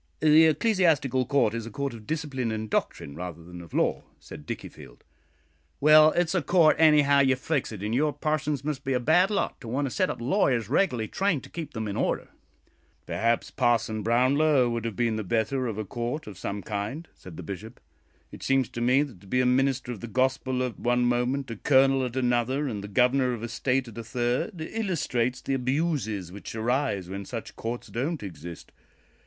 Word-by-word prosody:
"The 155 Hz, +1 st, +6 dB
Ecclesiastical 155 Hz, -, +2 dB
Court 140 Hz, -6 st, +2 dB
is 115 Hz, -1 st, -4 dB
a -, -, -6 dB
court 140 Hz, +3 st, -3 dB
of 110 Hz, -2 st, -11 dB
discipline 140 Hz, -7 st, -2 dB
and 110 Hz, -1 st, -4 dB
doctrine 70 Hz, -, -2 dB
rather 85 Hz, -1 st, -7 dB
than 90 Hz, +1 st, -10 dB
of 85 Hz, -, -13 dB
law," -, -, +1 dB, 0.2 s
said 75 Hz, -, -12 dB
Dickiefield. -, -, -8 dB, 0.8 s
"Well, 155 Hz, +1 st, +7 dB
it's 175 Hz, -1 st, +1 dB
a 180 Hz, -, +1 dB
court 160 Hz, +1 st, +4 dB
anyhow 150 Hz, -3 st, +5 dB
you 135 Hz, -1 st, +4 dB
fix 135 Hz, 0 st, -2 dB
it; 105 Hz, -3 st, -7 dB
and 105 Hz, +2 st, -2 dB
your 150 Hz, +4 st, +2 dB
parsons 150 Hz, -1 st, -2 dB
must 145 Hz, -2 st, -3 dB
be 135 Hz, -, -1 dB
a 125 Hz, -, +1 dB
bad 170 Hz, +9 st, +4 dB
lot 205 Hz, -2 st, -2 dB
to -, -, -9 dB
want 135 Hz, +5 st, -1 dB
a 135 Hz, -, -3 dB
set -, -, +1 dB
of -, -, -4 dB
lawyers 120 Hz, -, +1 dB
reg'larly 125 Hz, -, +1 dB
trained 185 Hz, -, 0 dB
to -, -, -13 dB
keep 160 Hz, -3 st, -6 dB
them 110 Hz, -1 st, -3 dB
in 100 Hz, -, -4 dB
order." -, -, -1 dB, 0.8 s
"Perhaps 115 Hz, +1 st, 0 dB
Parson 115 Hz, -3 st, +1 dB
Brownlow 130 Hz, +3 st, +3 dB
would 115 Hz, -1 st, -3 dB
have 115 Hz, -3 st, -3 dB
been 115 Hz, -1 st, 0 dB
the 110 Hz, -, -3 dB
better 115 Hz, +6 st, 0 dB
of 110 Hz, -3 st, -4 dB
a 110 Hz, -, -3 dB
court 120 Hz, +8 st, -4 dB
of 105 Hz, -, -9 dB
some 100 Hz, +1 st, -5 dB
kind," 110 Hz, +10 st, -4 dB
said 90 Hz, -4 st, -12 dB
the 90 Hz, -, -7 dB
Bishop. 100 Hz, +7 st, -8 dB, 0.5 s
"It -, -, -11 dB
seems 135 Hz, -2 st, +1 dB
to 120 Hz, -, -6 dB
me 130 Hz, +4 st, +4 dB
that 120 Hz, -12 st, -10 dB
to 100 Hz, -, -16 dB
be 125 Hz, +6 st, +1 dB
a 125 Hz, -, +3 dB
minister 130 Hz, 0 st, +1 dB
of 115 Hz, -, -6 dB
the 120 Hz, -, -7 dB
Gospel 130 Hz, +2 st, 0 dB
at 125 Hz, -3 st, -4 dB
one 120 Hz, 0 st, +1 dB
moment, 125 Hz, +2 st, 0 dB
a 115 Hz, -, -6 dB
colonel 135 Hz, +1 st, +4 dB
at 125 Hz, -1 st, -4 dB
another, 130 Hz, +3 st, +1 dB
and 105 Hz, -6 st, -4 dB
the -, -, -6 dB
Governor 125 Hz, +4 st, +2 dB
of 115 Hz, -2 st, -6 dB
a -, -, -2 dB
State 125 Hz, +2 st, -1 dB
at 115 Hz, -, -11 dB
a -, -, -5 dB
third, 125 Hz, -, -2 dB
illustrates 150 Hz, -, -1 dB
the 135 Hz, -, -2 dB
abuses 130 Hz, -, -1 dB
which 100 Hz, +3 st, -8 dB
arise 110 Hz, -5 st, -1 dB
when 100 Hz, +2 st, -5 dB
such 115 Hz, +3 st, -7 dB
courts 120 Hz, +2 st, -5 dB
don't 140 Hz, +3 st, -3 dB
exist. 85 Hz, -2 st, -9 dB
125 Hz, 205 wpm, -27 LUFS, 110-145 Hz, 0.8 s, Well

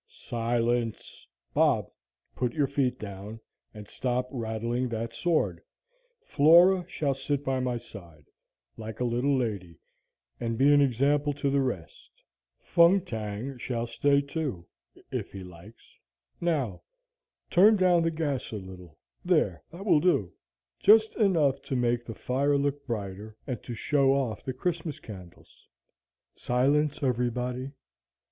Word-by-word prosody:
"Silence! 120 Hz, 0 st, -2 dB, 0.3 s
Bob, -, -, +3 dB, 0.5 s
put 125 Hz, -2 st, -1 dB
your 150 Hz, -3 st, +2 dB
feet 135 Hz, -2 st, 0 dB
down, 100 Hz, +2 st, -8 dB, 0.3 s
and 105 Hz, -1 st, -11 dB
stop 125 Hz, 0 st, -2 dB
rattling 115 Hz, +1 st, -2 dB
that 115 Hz, 0 st, -4 dB
sword. 170 Hz, -3 st, 0 dB, 0.6 s
Flora 175 Hz, -, +5 dB
shall 140 Hz, -3 st, -1 dB
sit 140 Hz, +1 st, -3 dB
by 130 Hz, -1 st, 0 dB
my 125 Hz, -1 st, -1 dB
side, 85 Hz, -10 st, -13 dB, 0.5 s
like 110 Hz, -1 st, -7 dB
a -, -, 0 dB
little 125 Hz, +4 st, +1 dB
lady, 100 Hz, -, -3 dB, 0.6 s
and 115 Hz, -1 st, -2 dB
be 140 Hz, +3 st, +5 dB
an 145 Hz, -, +6 dB
example 140 Hz, +3 st, +2 dB
to 140 Hz, -1 st, -1 dB
the 140 Hz, 0 st, +2 dB
rest. 100 Hz, -11 st, -5 dB, 0.5 s
Fung 170 Hz, +3 st, +4 dB
Tang 110 Hz, +2 st, -5 dB
shall 120 Hz, -1 st, -2 dB
stay, 140 Hz, +4 st, +2 dB
too, 140 Hz, -, -4 dB, 0.5 s
if -, -, -4 dB
he 95 Hz, -1 st, -7 dB
likes. 90 Hz, +5 st, -15 dB, 0.4 s
Now, 145 Hz, -, -1 dB, 0.7 s
turn 205 Hz, +5 st, +6 dB
down 180 Hz, -3 st, +4 dB
the 165 Hz, -, +2 dB
gas 155 Hz, -5 st, -3 dB
a -, -, -4 dB
little; 90 Hz, -5 st, -10 dB, 0.3 s
there, 155 Hz, -, +1 dB
that 185 Hz, +4 st, -9 dB
will 170 Hz, -7 st, +5 dB
do, 150 Hz, -, +1 dB, 0.5 s
just 220 Hz, +2 st, +5 dB
enough 160 Hz, -, +2 dB
to 135 Hz, -, -4 dB
make 120 Hz, -1 st, 0 dB
the 115 Hz, -, -7 dB
fire 140 Hz, +3 st, +1 dB
look 140 Hz, 0 st, -2 dB
brighter, 105 Hz, -1 st, -5 dB
and 125 Hz, -5 st, -4 dB
to 120 Hz, -, -7 dB
show 135 Hz, +2 st, +2 dB
off 125 Hz, -7 st, -2 dB
the 130 Hz, -, -4 dB
Christmas 160 Hz, +2 st, -3 dB
candles. 90 Hz, -5 st, -13 dB, 0.7 s
Silence, 145 Hz, +4 st, +1 dB
everybody! 125 Hz, +1 st, -1 dB
125 Hz, 135 wpm, -28 LUFS, 115-145 Hz, 0.7 s, an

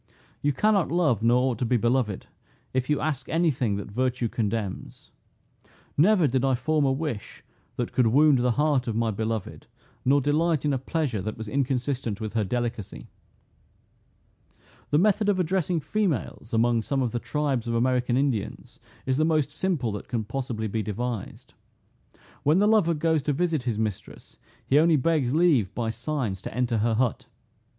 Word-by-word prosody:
You 145 Hz, -, +2 dB
cannot 200 Hz, +4 st, +2 dB
love, 155 Hz, -, +2 dB
nor 125 Hz, +3 st, +3 dB
ought 115 Hz, -, -5 dB
to -, -, -1 dB
be 120 Hz, +1 st, +2 dB
beloved, 120 Hz, -3 st, 0 dB, 0.5 s
if 130 Hz, +1 st, -1 dB
you 150 Hz, -, +2 dB
ask 145 Hz, -3 st, -3 dB
any 165 Hz, 0 st, +2 dB
thing 120 Hz, -6 st, -1 dB
that 100 Hz, 0 st, -6 dB
virtue 125 Hz, +1 st, -1 dB
condemns. 105 Hz, -3 st, -4 dB, 0.8 s
Never 180 Hz, +3 st, +4 dB
did 130 Hz, 0 st, 0 dB
I 135 Hz, -1 st, +3 dB
form 150 Hz, +4 st, +1 dB
a 135 Hz, -, +2 dB
wish 135 Hz, -6 st, -4 dB, 0.3 s
that -, -, -3 dB
could 125 Hz, -3 st, +2 dB
wound 140 Hz, +3 st, +5 dB
the 125 Hz, 0 st, +2 dB
heart 145 Hz, -2 st, +1 dB
of 115 Hz, -, -2 dB
my 115 Hz, 0 st, +1 dB
beloved, 110 Hz, 0 st, -4 dB, 0.4 s
nor 140 Hz, +3 st, +4 dB
delight 150 Hz, +2 st, +1 dB
in 145 Hz, -, +2 dB
a 135 Hz, -, 0 dB
pleasure 135 Hz, -, -2 dB
that 110 Hz, +3 st, -5 dB
was 110 Hz, 0 st, -6 dB
inconsistent 130 Hz, -3 st, -1 dB
with 110 Hz, -1 st, -5 dB
her 110 Hz, -2 st, +1 dB
delicacy." 120 Hz, -1 st, -4 dB, 1.8 s
The 145 Hz, -, +3 dB
method 205 Hz, +3 st, +3 dB
of 195 Hz, -2 st, +2 dB
addressing 180 Hz, -1 st, 0 dB
females, 150 Hz, -, -2 dB
among 115 Hz, 0 st, +2 dB
some 135 Hz, +4 st, -1 dB
of 120 Hz, -, -1 dB
the 120 Hz, -, -2 dB
tribes 140 Hz, -4 st, -2 dB
of 115 Hz, -, -1 dB
American 125 Hz, 0 st, +1 dB
Indians, 115 Hz, -6 st, -2 dB, 0.3 s
is 130 Hz, 0 st, 0 dB
the 155 Hz, -, +3 dB
most 155 Hz, -3 st, +1 dB
simple 150 Hz, -, -1 dB
that 105 Hz, -, -6 dB
can 115 Hz, -3 st, -2 dB
possibly 115 Hz, -1 st, -4 dB
be 110 Hz, +2 st, -2 dB
devised. 110 Hz, +1 st, -5 dB, 0.9 s
When 150 Hz, +4 st, +3 dB
the 205 Hz, -, +4 dB
lover 205 Hz, -7 st, +3 dB
goes 160 Hz, 0 st, +1 dB
to 145 Hz, +1 st, -1 dB
visit 165 Hz, -1 st, 0 dB
his 120 Hz, -3 st, -2 dB
mistress, 110 Hz, -3 st, -5 dB, 0.3 s
he 140 Hz, -, +4 dB
only 165 Hz, +1 st, +4 dB
begs 145 Hz, -2 st, +1 dB
leave, 150 Hz, -, +3 dB
by 115 Hz, -2 st, -1 dB
signs, 120 Hz, -5 st, -3 dB
to -, -, -7 dB
enter 120 Hz, -3 st, +1 dB
her 115 Hz, +1 st, +1 dB
hut. 120 Hz, 0 st, -1 dB
130 Hz, 175 wpm, -26 LUFS, 115-150 Hz, 1.8 s, wound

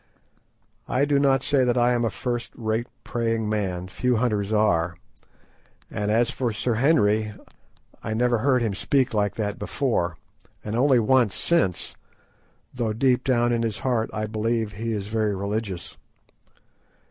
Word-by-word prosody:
I 135 Hz, +3 st, +2 dB
do 145 Hz, -1 st, +2 dB
not 135 Hz, -2 st, +3 dB
say 140 Hz, -2 st, +3 dB
that 125 Hz, 0 st, +1 dB
I 120 Hz, 0 st, +3 dB
am 120 Hz, -1 st, +1 dB
a 115 Hz, -, +1 dB
first 120 Hz, +3 st, -4 dB
rate 115 Hz, +1 st, -2 dB, 0.2 s
praying 115 Hz, -2 st, -1 dB
man, 95 Hz, -4 st, -2 dB
few 125 Hz, +6 st, 0 dB
hunters 110 Hz, -3 st, 0 dB
are, 85 Hz, -6 st, +2 dB, 1.0 s
and 105 Hz, -1 st, -2 dB
as 115 Hz, +2 st, +2 dB
for 125 Hz, -3 st, -1 dB
Sir 115 Hz, +3 st, -1 dB
Henry, 110 Hz, -5 st, +2 dB, 0.7 s
I 110 Hz, -, -3 dB
never 120 Hz, 0 st, +2 dB
heard 130 Hz, -1 st, +2 dB
him 110 Hz, -3 st, -1 dB
speak 130 Hz, +5 st, +1 dB
like 105 Hz, -2 st, 0 dB
that 105 Hz, -2 st, -3 dB
before, 105 Hz, -, -1 dB, 0.5 s
and 105 Hz, +1 st, -4 dB
only 130 Hz, +2 st, +4 dB
once 115 Hz, -2 st, +3 dB
since, 165 Hz, -, 0 dB, 0.8 s
though 115 Hz, -4 st, -1 dB
deep 125 Hz, +2 st, +2 dB
down 120 Hz, -2 st, +2 dB
in 115 Hz, -, 0 dB
his 115 Hz, -3 st, -1 dB
heart 120 Hz, -4 st, +1 dB
I 110 Hz, 0 st, -2 dB
believe 110 Hz, 0 st, -1 dB
that 100 Hz, -, -13 dB
he 115 Hz, 0 st, -2 dB
is 105 Hz, -3 st, -2 dB
very 105 Hz, -1 st, 0 dB
religious. 100 Hz, -2 st, -4 dB
115 Hz, 160 wpm, -24 LUFS, 105-125 Hz, 1.0 s, only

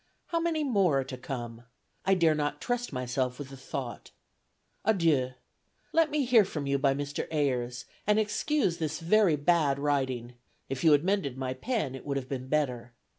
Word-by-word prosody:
How 335 Hz, -, +1 dB
many 330 Hz, -2 st, 0 dB
more 195 Hz, -, +3 dB
are -, -, -3 dB
to 130 Hz, 0 st, -7 dB
come? 120 Hz, -2 st, -6 dB, 0.4 s
I 195 Hz, -, +5 dB
dare 165 Hz, -3 st, +4 dB
not 145 Hz, -1 st, -1 dB
trust 245 Hz, +4 st, -2 dB
myself 125 Hz, -1 st, -2 dB
with 140 Hz, -2 st, -7 dB
the 135 Hz, -, -9 dB
thought. 130 Hz, -2 st, -6 dB, 0.7 s
Adieu. 160 Hz, -11 st, +2 dB, 0.6 s
Let 325 Hz, -1 st, +4 dB
me 295 Hz, -2 st, 0 dB
hear 240 Hz, -3 st, +6 dB
from 150 Hz, -6 st, -4 dB
you 140 Hz, 0 st, +1 dB
by 135 Hz, -1 st, +3 dB
Mr. 145 Hz, +1 st, -3 dB
Ayers, 125 Hz, -5 st, -1 dB, 0.2 s
and 210 Hz, 0 st, +4 dB
excuse 215 Hz, -, +1 dB
this 155 Hz, -2 st, -2 dB
very 180 Hz, 0 st, +4 dB
bad 150 Hz, -2 st, +2 dB
writing; 130 Hz, -4 st, -1 dB, 0.4 s
if 135 Hz, +2 st, -3 dB
you 160 Hz, -, +6 dB
had 145 Hz, +1 st, +4 dB
mended 185 Hz, -9 st, 0 dB
my 130 Hz, -1 st, -2 dB
pen 155 Hz, -, -2 dB
it 135 Hz, -, -8 dB
would 140 Hz, -1 st, -2 dB
have 130 Hz, -2 st, -4 dB
been 130 Hz, -1 st, -4 dB
better. 125 Hz, -5 st, -1 dB
145 Hz, 180 wpm, -29 LUFS, 130-195 Hz, 0.7 s, hear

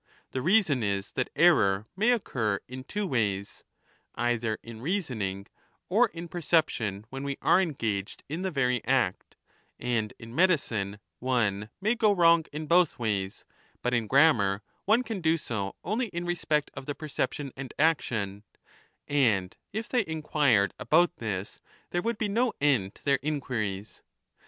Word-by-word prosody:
The 130 Hz, -, -2 dB
reason 170 Hz, -, +3 dB
is 100 Hz, -2 st, -1 dB
that 130 Hz, -, -2 dB
error 110 Hz, -, +4 dB
35 -, -, -52 dB
may 215 Hz, +5 st, +2 dB
occur 115 Hz, -, 0 dB
in 130 Hz, +1 st, -7 dB
two 210 Hz, 0 st, -2 dB
ways 100 Hz, -, -1 dB, 0.5 s
(either 120 Hz, -2 st, 0 dB
in 115 Hz, -1 st, -10 dB
reasoning 120 Hz, -, -2 dB, 0.4 s
or -, -, +4 dB
in 170 Hz, +1 st, -8 dB
perception 150 Hz, -, 0 dB
when 135 Hz, +1 st, -5 dB
we 140 Hz, -1 st, -3 dB
are 185 Hz, -, +5 dB
engaged 115 Hz, -, -2 dB
in 155 Hz, +5 st, -4 dB
the 190 Hz, -, -1 dB
very 125 Hz, -6 st, 0 dB
act), 120 Hz, -6 st, 0 dB, 0.4 s
and 115 Hz, -4 st, -1 dB
in 115 Hz, 0 st, -11 dB
medicine 120 Hz, -, +1 dB, 0.2 s
one 110 Hz, -5 st, 0 dB
may 215 Hz, +4 st, +2 dB
go 220 Hz, -3 st, +3 dB
wrong 170 Hz, -3 st, +5 dB
in 155 Hz, +1 st, -5 dB
both 170 Hz, +1 st, +3 dB
ways, 100 Hz, -4 st, -2 dB, 0.4 s
but 125 Hz, -, 0 dB
in 115 Hz, -3 st, +1 dB
grammar 105 Hz, -8 st, +4 dB, 0.2 s
one 225 Hz, +5 st, +4 dB
can 220 Hz, -6 st, -4 dB
do 160 Hz, 0 st, +3 dB
so 105 Hz, -9 st, -4 dB
only 225 Hz, +7 st, -1 dB
in 175 Hz, -3 st, -5 dB
respect 155 Hz, -4 st, 0 dB
of 130 Hz, -, -8 dB
the 145 Hz, -, -3 dB
perception 145 Hz, -2 st, -3 dB
and 135 Hz, -1 st, -7 dB
action, 110 Hz, -10 st, 0 dB, 0.6 s
and 110 Hz, -10 st, +2 dB, 0.2 s
if 220 Hz, +2 st, -4 dB
they 245 Hz, -3 st, +1 dB
inquired 150 Hz, -, +2 dB
about 175 Hz, +2 st, +3 dB
this 105 Hz, -4 st, -4 dB, 0.3 s
there 175 Hz, -, 0 dB
would 230 Hz, +1 st, -1 dB
be 215 Hz, -, 0 dB
no 230 Hz, +4 st, +1 dB
end 125 Hz, -10 st, +2 dB
to -, -, -21 dB
their 140 Hz, -1 st, +3 dB
inquiries. 110 Hz, -9 st, -3 dB
135 Hz, 155 wpm, -28 LUFS, 110-170 Hz, 0.6 s, are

